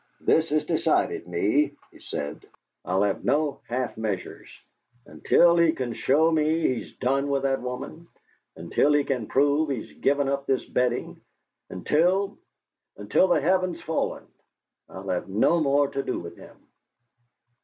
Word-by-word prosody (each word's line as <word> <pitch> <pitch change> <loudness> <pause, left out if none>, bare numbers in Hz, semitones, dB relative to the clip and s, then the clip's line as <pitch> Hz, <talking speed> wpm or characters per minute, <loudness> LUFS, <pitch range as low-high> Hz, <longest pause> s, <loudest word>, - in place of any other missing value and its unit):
"This 160 0 +2
has 150 +1 0
decided - - 0
me," 125 +12 +1 0.2
he - - -18
said. 75 0 -6 0.4
"I'll 95 +2 0
have 100 -1 -1
no 145 -1 0
half 125 +1 -2
measures. 105 -5 -5 0.6
Until 170 0 +3
he 170 -1 +4
can 125 -6 -4
show 155 +8 +2
me 160 +1 +1
he's 120 - -8
done 135 +3 0
with 140 -1 0
that 135 -1 0
woman, 125 +7 -7 0.5
until 150 - +1
he 145 -1 +3
can 125 -6 -3
prove 145 +3 +2
he's 130 -6 -5
given 140 0 +1
up 140 0 -2
this 135 - 0
betting, 125 0 -2 0.5
until 180 - 0 0.6
until 190 - +2
the 175 - +3
heaven's 185 -2 +1
fallen, 160 0 -2 0.6
I'll 95 +1 -8
have 90 +1 -2
no 110 - +2
more 145 -1 +2
to 135 - -3
do - - -3
with 85 0 -8
him!" - - -15
140 Hz, 145 wpm, -25 LUFS, 120-155 Hz, 0.6 s, he